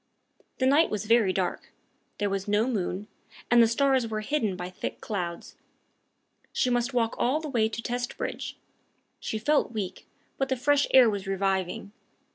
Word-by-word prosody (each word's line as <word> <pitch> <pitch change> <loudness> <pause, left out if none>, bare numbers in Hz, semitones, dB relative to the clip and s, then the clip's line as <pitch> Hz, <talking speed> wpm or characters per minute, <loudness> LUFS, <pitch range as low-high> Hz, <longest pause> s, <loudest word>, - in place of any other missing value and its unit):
The 260 - +1
night 290 +5 +5
was 210 0 -3
very 225 -3 +4
dark. 185 -1 -2 0.5
There 205 -1 -1
was 195 0 -2
no 210 +3 +2
moon, 205 -3 -2 0.4
and 240 0 +7
the 230 - +6
stars 260 +1 +2
were 215 -1 -3
hidden 220 -5 0
by 180 0 -6
thick - - -5
clouds. 175 -5 -5 0.9
She 250 - +1
must 245 +1 +1
walk 230 -2 +2
all 265 +5 +2
the 315 - -6
way 225 -5 +2
to 230 +1 -5
Testbridge. 245 0 -4 0.6
She 220 - -3
felt 265 +2 +1
weak, 200 -4 -5 0.3
but 270 - 0
the 260 - 0
fresh 285 +3 +3
air 260 -2 +8
was 200 -3 -2
reviving. 195 0 -1
225 Hz, 165 wpm, -27 LUFS, 195-255 Hz, 0.9 s, air